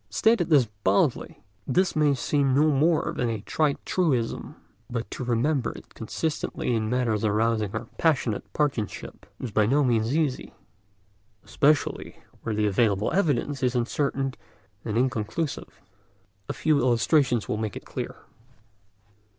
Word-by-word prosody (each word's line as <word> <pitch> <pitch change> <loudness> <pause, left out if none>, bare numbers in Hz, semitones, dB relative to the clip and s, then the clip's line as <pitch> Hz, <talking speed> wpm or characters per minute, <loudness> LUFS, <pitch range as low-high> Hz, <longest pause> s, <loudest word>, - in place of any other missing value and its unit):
Stated 180 - +2
thus 145 -6 +5 0.2
baldly, 95 +1 +1 0.2
this 180 +7 +1
may 150 -2 +3
seem 135 0 +1
no 155 +2 +4
more 155 +4 +2
than 120 - 0
a 110 -3 -3
trite 145 +5 0
truism. 135 -11 -1 0.3
But 120 -1 -4
to - - -5
remember 125 +2 0
it - - -14
consistently 135 +2 -3
in 110 -1 0
matters 120 -4 0
arousing 110 -1 +1
our 110 +2 -3
passionate 135 -9 0
partisanship 135 -9 -3
is 125 - -5
by 105 0 +3
no 145 +5 +3
means 120 +2 +1
easy, 145 -6 -2 0.9
especially 145 +1 +1 0.2
where 110 -2 -3
the 105 0 +1
available 105 0 +2
evidence 145 -6 0
is 125 -1 +1
uncertain 135 +2 -1 0.5
and 110 -1 -2
inconclusive. 130 +4 -2 0.7
A - - -1
few 155 -2 +2
illustrations 125 0 +2
will - - -1
make 110 -2 -3
this - - -8
clear. - - -6
125 Hz, 135 wpm, -26 LUFS, 110-145 Hz, 0.9 s, thus